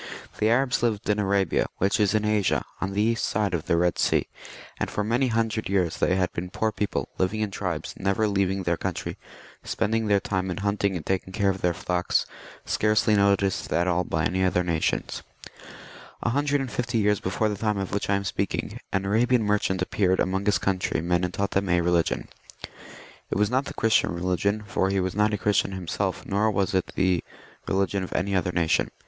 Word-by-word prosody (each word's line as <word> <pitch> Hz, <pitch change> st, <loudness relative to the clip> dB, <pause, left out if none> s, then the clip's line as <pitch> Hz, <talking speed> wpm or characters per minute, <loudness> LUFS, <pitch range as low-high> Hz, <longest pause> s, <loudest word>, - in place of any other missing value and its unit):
* -, -, -20 dB
The 110 Hz, -, +3 dB
Arabs 125 Hz, +2 st, +2 dB
lived 115 Hz, -3 st, 0 dB
in 105 Hz, -, 0 dB
Arabia, 100 Hz, -2 st, +1 dB
which 100 Hz, +4 st, +1 dB
is 105 Hz, 0 st, +3 dB
in 105 Hz, 0 st, +1 dB
Asia, 105 Hz, -3 st, +1 dB, 0.2 s
on 95 Hz, 0 st, -2 dB
the 105 Hz, +1 st, +1 dB
east 115 Hz, +1 st, +1 dB
side 100 Hz, -3 st, 0 dB
of 85 Hz, -3 st, -2 dB
the 85 Hz, -, +2 dB
Bed 90 Hz, 0 st, +1 dB
Sea> -, -, +2 dB, 0.5 s
and -, -, -1 dB
for 105 Hz, -, -2 dB
many 120 Hz, +5 st, +1 dB
hundred 115 Hz, -2 st, -1 dB
years 90 Hz, -4 st, +1 dB
they 90 Hz, -, +2 dB
had 95 Hz, -1 st, 0 dB
been 90 Hz, +1 st, -4 dB
poor 110 Hz, +3 st, -1 dB
people, 105 Hz, 0 st, -2 dB
living 100 Hz, +4 st, 0 dB
in 105 Hz, -2 st, -1 dB
tribes, 90 Hz, -5 st, -3 dB
never 100 Hz, +3 st, +1 dB
leaving 95 Hz, -1 st, 0 dB
their 85 Hz, -1 st, 0 dB
coun 95 Hz, -3 st, -3 dB
try, -, -, -5 dB, 0.5 s
spending 110 Hz, +1 st, 0 dB
their 100 Hz, -1 st, +4 dB
time 95 Hz, -1 st, -2 dB
in 90 Hz, -, -3 dB
hunting 100 Hz, -1 st, 0 dB
and 80 Hz, -, -5 dB
taking 95 Hz, 0 st, -1 dB
care 100 Hz, -1 st, +2 dB
of 95 Hz, -, -6 dB
their 90 Hz, -1 st, +1 dB
flocks, 90 Hz, +1 st, 0 dB, 0.4 s
scarcely 105 Hz, 0 st, +2 dB
noticed 100 Hz, -1 st, +2 dB
at 85 Hz, +1 st, +1 dB
all 90 Hz, 0 st, +2 dB
by 80 Hz, -1 st, -1 dB
any 95 Hz, +1 st, 0 dB
other 90 Hz, -1 st, +2 dB
nation 85 Hz, -2 st, 0 dB, 1.2 s
A -, -, +1 dB
hundred 145 Hz, +2 st, +1 dB
and 130 Hz, -3 st, -4 dB
fifty 120 Hz, +1 st, -1 dB
years 105 Hz, -1 st, +2 dB
before 100 Hz, +4 st, 0 dB
the 105 Hz, -, -1 dB
time 105 Hz, 0 st, -1 dB
of 95 Hz, -1 st, -3 dB
which 100 Hz, 0 st, -2 dB
I 100 Hz, -, +3 dB
am 100 Hz, -, -1 dB
speaking, 95 Hz, -, -3 dB
an 95 Hz, 0 st, 0 dB
Arabian 115 Hz, +4 st, +2 dB
merchant 105 Hz, -3 st, +1 dB
appeared 95 Hz, 0 st, +1 dB
among 95 Hz, +2 st, 0 dB
his 105 Hz, -, +4 dB
countrymen 90 Hz, -2 st, 0 dB
and 90 Hz, -, -1 dB
taught 100 Hz, +2 st, -2 dB
them 100 Hz, -1 st, 0 dB
a 90 Hz, 0 st, +3 dB
religion. 85 Hz, -1 st, +1 dB, 1.0 s
It -, -, -1 dB
was 105 Hz, +2 st, +2 dB
not 130 Hz, +2 st, +1 dB
the -, -, -7 dB
Christian 115 Hz, -5 st, +2 dB
religion, 90 Hz, +4 st, 0 dB
for 95 Hz, -1 st, 0 dB
he 95 Hz, 0 st, +1 dB
was 95 Hz, -1 st, -1 dB
not 105 Hz, +1 st, +2 dB
a 105 Hz, -, 0 dB
Christian 100 Hz, -1 st, +1 dB
himself, 95 Hz, +1 st, -3 dB
nor 105 Hz, +3 st, +1 dB
was 100 Hz, -2 st, 0 dB
it 95 Hz, -1 st, 0 dB
the 90 Hz, -2 st, +2 dB, 0.4 s
religion 95 Hz, 0 st, 0 dB
of 90 Hz, -, -7 dB
any 95 Hz, +2 st, 0 dB
other 90 Hz, -1 st, +1 dB
nation. 85 Hz, -2 st, +1 dB
100 Hz, 210 wpm, -25 LUFS, 90-105 Hz, 1.2 s, their